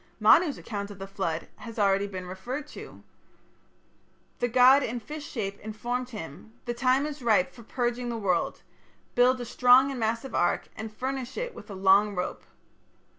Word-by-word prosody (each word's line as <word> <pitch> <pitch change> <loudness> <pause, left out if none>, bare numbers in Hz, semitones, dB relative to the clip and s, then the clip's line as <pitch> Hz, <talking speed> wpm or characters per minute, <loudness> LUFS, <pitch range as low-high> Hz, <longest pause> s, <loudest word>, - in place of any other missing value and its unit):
" - - -37
Manu's 335 -5 +6
account 200 -2 -5
of 205 - -10
the 195 - -6
flood 190 -4 -3
has 230 -2 -9
been 210 - +1
already 195 +1 +2
referred 190 +9 -6
to - - -13
(Chapter - - -10
II). - - -18 1.4
The 245 - +1
god 255 +3 +6
in 240 -2 -3
fish 295 +6 -8
shape 200 -5 -4
informed 240 +4 -4
him: 210 - -9
"The 240 - -2
time 255 +3 +2
is 300 -2 -6
ripe 215 -6 +2
for 235 - -13
purging 240 +1 -2
the 235 - -3
world.... 185 -6 -1 0.5
Build 250 +1 +4
a 245 - -4
strong 250 +3 +5
and 265 - -5
massive 230 +4 -2
ark, 175 - +1
and 220 0 -6
furnish 260 +2 -4
it - - -3
with - - -12
a 200 - -7
long 195 +2 +4
rope...." 180 0 -3
235 Hz, 185 wpm, -27 LUFS, 200-255 Hz, 1.4 s, Manu's